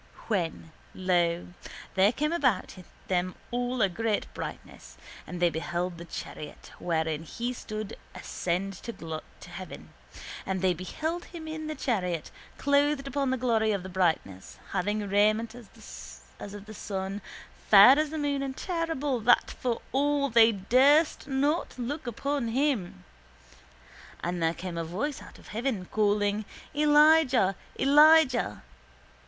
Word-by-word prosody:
When, 170 -5 -2 0.2
lo, 175 -2 +1 0.4
there 195 +2 +4
came 300 +6 -1
about 255 - +1 0.3
them 185 0 0 0.2
all 245 -1 0
a - - +5
great 215 +3 -1
brightness - - -8 0.3
and 180 - -6
they 175 -1 +3
beheld 175 +2 -3
the 170 - -8
chariot 150 -2 -8
wherein 160 -2 -1
He 235 +10 -4
stood 215 -3 -6 0.2
ascend 185 +3 -2
to 165 -9 -6 0.3
heaven. - - -9 0.5
And 190 -1 -3
they 185 -1 +4
beheld 315 - -4
Him 330 -2 -9
in 315 0 -5
the 310 - -4
chariot, 180 - -2 0.3
clothed 285 0 +2
upon 275 +1 -1
in - - 0
the 260 - 0
glory 225 -3 +2
of 195 -3 -3
the 190 - -7
brightness, 165 - -1
having 205 +2 -1
raiment 215 +3 +2
as 235 -4 -12 0.2
of 205 0 -8
the 215 - -10
sun, 195 -1 -4 0.5
fair 220 +8 +9
as 305 -1 +1
the 315 - -5
moon 285 -2 -1
and 270 -1 -4
terrible 325 -7 -1
that 240 +2 +4
for 245 -2 -3
awe 280 +1 +1
they 230 -1 +6
durst 265 - +3
not 285 +4 0
look 260 +3 -4
upon 275 +2 -2
Him. 225 - -1 1.2
And 175 0 -2
there 165 0 +1
came 175 -1 -5
a - - -1
voice 215 - -3
out - - -13
of - - -16
heaven, 225 -4 -2
calling: 205 0 +1 0.3
_Elijah! 295 -7 +5 0.3
Elijah! 285 - +5
220 Hz, 140 wpm, -28 LUFS, 185-280 Hz, 1.2 s, fair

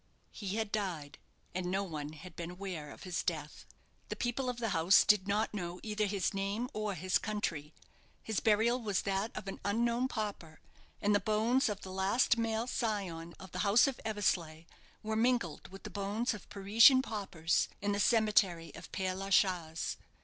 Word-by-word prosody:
He 200 -2 -4
had 220 -2 -2
died, 170 -9 -3 0.3
and 180 0 -2
no 190 +2 0
one 155 -5 -5
had 165 +2 -11
been 170 0 -5
aware 180 -5 -6
of - - -11
his 180 -2 -2
death. - - -4 0.4
The - - -3
people 250 +2 -1
of 250 - -3
the 230 -2 -1
house 170 +1 +5
did 205 -2 +4
not 210 +2 0
know 180 -3 -4
either 210 -1 -1
his 200 -1 -1
name 200 +5 -2
or 210 -2 -2
his 185 +3 +1
country. 170 -9 -3 0.5
His 220 -3 -1
burial 225 +3 +3
was 205 -4 0
that 195 +2 0
of - - -6
an 195 - -5
unknown 235 +4 +1
pauper; 205 -9 -5 0.4
and 205 0 +3
the 205 - +4
bones 220 +6 +2
of 205 -1 -4
the 190 - -8
last 195 +7 +2
male 225 0 0
scion 195 -9 -3
of 190 -1 -11
the - - -5
house 210 +3 +5
of 275 -3 -3
Eversleigh 175 -7 -1 0.4
were 220 0 -2
mingled 225 -8 +1
with 195 +1 -12
the - - -7
bones 205 +4 -1
of 210 - -10
Parisian 225 +7 +6
paupers 190 -8 -1
in 205 0 -1
the 200 - 0
cemetery 200 -7 +3
of 165 - -11
Père 185 -1 -1
la 195 +1 -5
Chaise. 175 -5 +1
200 Hz, 185 wpm, -33 LUFS, 180-220 Hz, 0.5 s, Parisian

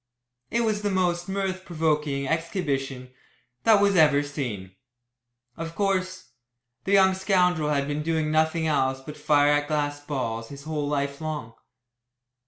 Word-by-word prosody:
It 235 - +1
was 215 -2 0
the 205 - 0
most 180 -2 0
mirth 190 -1 -2
provoking 150 -5 -1
exhibition 140 -6 -2 0.5
that 220 -2 +6
was 200 -1 +3
ever 150 -4 +5
seen. 120 -11 -5 0.8
Of 165 0 -6
course, 185 -6 -1 0.5
the 195 - 0
young 190 -1 +6
scoundrel 180 -5 +2
had 140 -1 0
been 145 +1 -2
doing 160 -1 0
nothing 160 +1 +1
else 135 -4 +1
but 150 +3 -9
fire 145 -1 +3
at 145 0 +1
glass 145 -1 -2
balls 115 -6 -3
his 140 0 -10
whole 150 -1 -3
life 140 0 -2
long. 150 -8 -5
155 Hz, 145 wpm, -25 LUFS, 145-180 Hz, 0.8 s, that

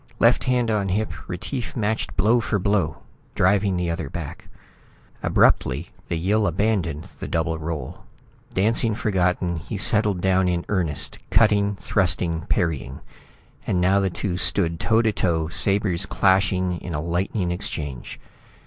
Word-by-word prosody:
Left - - +3
hand 125 -3 +1
on 100 -3 0
hip, 105 +4 -1 0.2
Retief 115 +8 -5
matched 110 -1 -2
blow 110 +5 +4
for 110 -2 -1
blow, 100 -6 0 0.3
driving 95 0 +2
the 90 -1 -1
other 80 -4 -4
back. - - -7 0.7
Abruptly, - - +2 0.2
the - - -2
Yill 100 +5 +1
abandoned 90 -4 -1
the - - -5
double 80 0 -1
role. 80 -1 -5 0.5
Dancing 110 +3 +2
forgotten, 90 -5 0
he 85 +6 -6
settled 105 -1 +2
down 95 0 +2
in 85 -1 -1
earnest, 85 -8 0
cutting, 105 -2 +3
thrusting, 90 -3 -1
parrying; 80 -7 -1 0.7
and 90 - +1
now 95 +3 +3
the 95 -1 +1
two 90 0 -3
stood 85 -3 +1
toe 115 0 +2
to 110 - +2
toe, 80 -5 0
sabres 95 0 +1
clashing 95 -2 +2
in 85 -3 -6
a - - -1
lightning 90 +3 -1
exchange. 75 -7 -5
95 Hz, 140 wpm, -23 LUFS, 85-105 Hz, 0.7 s, blow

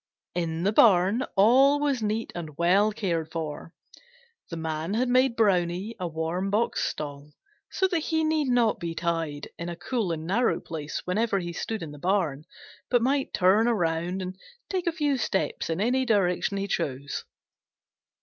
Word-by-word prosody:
In 165 -1 -2
the 205 +3 +2
barn 205 +3 +5
all 260 +8 +5
was 285 -4 0
neat 215 +1 -2
and 155 -4 -7
well 195 +5 +4
cared 170 -7 -2
for. 160 -1 -5 0.8
The 165 - -5
Man 160 +4 -3
had 250 +3 +1
made 255 -1 +3
Brownie 190 0 +1
a 180 - -2
warm 165 +4 -2
box 215 +4 0
stall, 145 0 -5 0.4
so 380 - +1
that 355 -3 0
he 320 0 0
need 310 -2 +1
not 245 -3 +2
be 165 -1 -4
tied 165 -4 -2
in 170 +1 -4
a 170 - -5
cool 220 -1 -2
and 160 -1 -4
narrow 225 +8 +1
place 155 -2 -6
whenever 205 +3 +1
he 175 -2 -4
stood 220 +3 -4
in 155 - -7
the 145 - -11
barn, 170 -5 0 0.4
but 245 -2 +3
might 270 +2 +1
turn 195 +5 +4
around 175 -3 0
and 185 +1 -7 0.3
take 370 -2 -2
a - - +3
few 295 -4 0
steps 195 -8 -1
in 165 +2 -1
any 250 +5 +2
direction 200 -4 +1
he 195 0 -2
chose. 140 -5 -3
190 Hz, 170 wpm, -26 LUFS, 165-235 Hz, 0.8 s, barn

